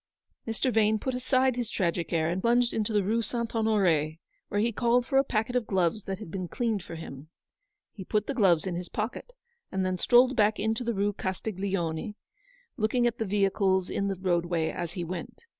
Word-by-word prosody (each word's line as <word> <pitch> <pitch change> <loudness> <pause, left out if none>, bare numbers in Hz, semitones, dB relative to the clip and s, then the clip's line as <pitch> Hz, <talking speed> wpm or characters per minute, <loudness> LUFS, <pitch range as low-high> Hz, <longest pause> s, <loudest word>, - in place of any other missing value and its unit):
Mr. 225 +3 0
Vane 220 0 +3
put 260 +5 -3
aside 255 0 +2
his 240 -2 -3
tragic 170 -5 -1
air, 160 -2 +1
and 175 +3 -1
plunged 240 +2 +3
into 220 0 -1
the 205 -2 +2
Rue 225 +4 +1
St. 235 +1 -2
Honore, 185 -9 +2 0.3
where 205 - -1
he 230 +3 +2
called 240 +2 +2
for 270 +1 +3
a - - +4
packet 240 -1 -1
of 245 -4 0
gloves 190 +1 0
that 195 -1 -3
had 165 - -9
been 185 -1 -4
cleaned 225 0 -1
for 170 - -9
him. 155 -2 -9 0.6
He 195 - -8
put 210 +2 0
the 280 - -2
gloves 190 -10 +3
in 185 - -2
his 175 +1 -5
pocket, 230 - -4 0.4
and 190 -1 -1
then 185 -1 -1
strolled 250 +5 +5
back 215 0 +3
into 220 +3 0
the 235 0 -1
Kue 205 0 0
Castiglione, 190 -1 -3 0.6
looking 240 +2 +1
at 240 -1 0
the 225 - 0
vehicles 195 -2 +1
in 200 - -1
the 195 - -1
roadway 175 -3 0
as 175 -1 -5
he 175 - -3
went. 180 - -7
205 Hz, 205 wpm, -28 LUFS, 180-230 Hz, 0.6 s, strolled